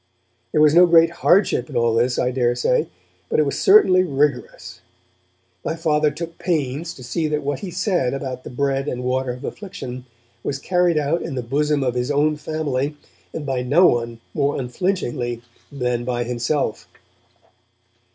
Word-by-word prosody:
There 150 Hz, -, +2 dB
was 155 Hz, -1 st, +6 dB
no 175 Hz, +2 st, +7 dB
great 165 Hz, -1 st, +5 dB
hardship 175 Hz, -, +3 dB
in -, -, -3 dB
all 115 Hz, -1 st, +2 dB
this, 120 Hz, +2 st, +1 dB
I 125 Hz, -, +1 dB
daresay, 125 Hz, 0 st, +1 dB, 0.4 s
but -, -, 0 dB
it 155 Hz, -, +4 dB
was 140 Hz, -, -2 dB
certainly 285 Hz, -, +6 dB
rigorous. 145 Hz, -3 st, -2 dB, 0.8 s
My -, -, -2 dB
Father 155 Hz, -2 st, +2 dB
took 165 Hz, +3 st, -7 dB
pains 160 Hz, -2 st, -2 dB
to 130 Hz, -, -12 dB
see 155 Hz, +7 st, -2 dB
that 150 Hz, -1 st, -2 dB
what 140 Hz, -1 st, -2 dB
he 200 Hz, -, -6 dB
had 175 Hz, -, -8 dB
said 180 Hz, -9 st, 0 dB
about 130 Hz, -2 st, -5 dB
the -, -, -8 dB
bread 135 Hz, +2 st, -1 dB
and 125 Hz, -2 st, -3 dB
water 130 Hz, 0 st, -1 dB
of 125 Hz, -, -11 dB
affliction 130 Hz, -11 st, -7 dB, 0.4 s
was 140 Hz, -, -2 dB
carried 175 Hz, +2 st, +1 dB
out 150 Hz, +3 st, 0 dB
in -, -, -5 dB
the 125 Hz, -, -3 dB
bosom 145 Hz, +3 st, 0 dB
of 125 Hz, -2 st, 0 dB
his 125 Hz, +1 st, -2 dB
own 150 Hz, +1 st, +2 dB
family, 150 Hz, -2 st, -3 dB, 0.3 s
and 155 Hz, -, -6 dB
by 135 Hz, -2 st, -1 dB
no 145 Hz, +9 st, +4 dB
one 115 Hz, -3 st, +1 dB
more 145 Hz, -1 st, 0 dB
unflinchingly 125 Hz, -4 st, -2 dB, 0.3 s
than 125 Hz, -3 st, -2 dB
by 120 Hz, -1 st, -1 dB
himself. 120 Hz, +4 st, -2 dB
140 Hz, 170 wpm, -21 LUFS, 125-160 Hz, 0.8 s, no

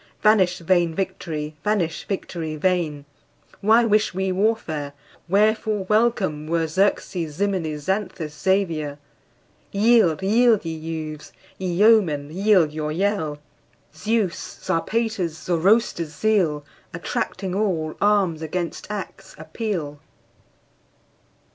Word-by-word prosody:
Vanish 195 Hz, -5 st, +4 dB
vain 170 Hz, -1 st, +1 dB
victory! 160 Hz, -5 st, -4 dB
vanish, 190 Hz, -7 st, -1 dB
victory 170 Hz, -5 st, -4 dB
vain! 155 Hz, -4 st, 0 dB, 0.5 s
Why 225 Hz, +3 st, +4 dB
wish 215 Hz, -3 st, +2 dB
we 190 Hz, 0 st, 0 dB
warfare? 180 Hz, -8 st, -1 dB, 0.4 s
Wherefore 215 Hz, +1 st, +2 dB
welcome 210 Hz, -9 st, +1 dB
were 165 Hz, 0 st, +1 dB
Xerxes, 165 Hz, -2 st, 0 dB
Ximenes, 170 Hz, -6 st, -1 dB
Xanthus, 185 Hz, -4 st, -2 dB
Xavier? 165 Hz, -7 st, 0 dB, 0.7 s
Yield, 200 Hz, -5 st, +3 dB
yield, 225 Hz, 0 st, +4 dB
ye 165 Hz, -, -3 dB
youths! 155 Hz, -1 st, -6 dB, 0.3 s
ye 190 Hz, -, -3 dB
yeomen, 175 Hz, -6 st, +3 dB
yield 185 Hz, -3 st, +3 dB
your 150 Hz, 0 st, -3 dB
yell! 170 Hz, -4 st, -1 dB, 0.6 s
Zeus', 210 Hz, +2 st, -2 dB
Zarpater's, 195 Hz, -2 st, -1 dB
Zoroaster's 175 Hz, -3 st, +1 dB
zeal, 170 Hz, -7 st, +1 dB, 0.3 s
Attracting 185 Hz, +2 st, -3 dB
all, 180 Hz, -6 st, -1 dB
arms 200 Hz, -6 st, +2 dB
against 170 Hz, +2 st, -4 dB
acts 195 Hz, -2 st, -7 dB
appeal! 170 Hz, -11 st, -4 dB
185 Hz, 100 wpm, -23 LUFS, 160-210 Hz, 0.7 s, Vanish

